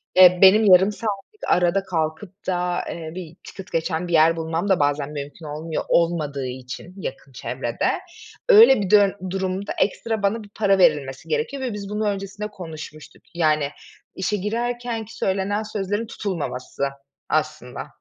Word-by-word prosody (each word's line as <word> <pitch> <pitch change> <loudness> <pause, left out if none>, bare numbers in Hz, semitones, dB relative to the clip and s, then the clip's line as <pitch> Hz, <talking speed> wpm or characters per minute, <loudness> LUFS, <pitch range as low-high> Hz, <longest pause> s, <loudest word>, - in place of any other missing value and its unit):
Eee, 180 -1 +8
benim 205 +3 +7
yarım 190 +3 +6
saatlik 210 - -5
arada 180 +2 +3
kalkıp 170 +2 -4
da 180 -1 0
eee, 160 -2 -6
bir 170 -3 -8
Ticket 190 -1 -10
geçen 165 +1 -1
bir 175 - -4
yer 165 +1 +5
bulmam 165 +4 -2
da 190 - +3
bazen 145 0 0
mümkün 145 +2 -7
olmuyor, 155 +2 -4
olmadığı 155 -5 +1
için 130 +7 -8
yakın 140 -6 -7
çevrede. 125 - -2 0.5
Öyle 410 - +8
bir 190 - -2
dön 200 -1 +5
durumda 190 +1 -2
ekstra 220 +1 0
bana 215 +2 +1
bir 205 - -14
para 200 -2 +2
verilmesi 150 -7 +2
gerekiyor 455 - -1
ve 250 -4 -2
biz 200 -1 -6
bunu 210 +1 -1
öncesinde 200 +1 -4
konuşmuştuk. 160 -6 -10
Yani, 155 -4 +2 0.5
işe 195 +2 -1
girerken 235 +2 -2
ki 225 - -13
söylenen 195 +2 0
sözlerin 205 +1 -3
tutulmaması 165 - -4 0.5
aslında. 155 -5 -2
185 Hz, 150 wpm, -23 LUFS, 160-205 Hz, 0.5 s, Eee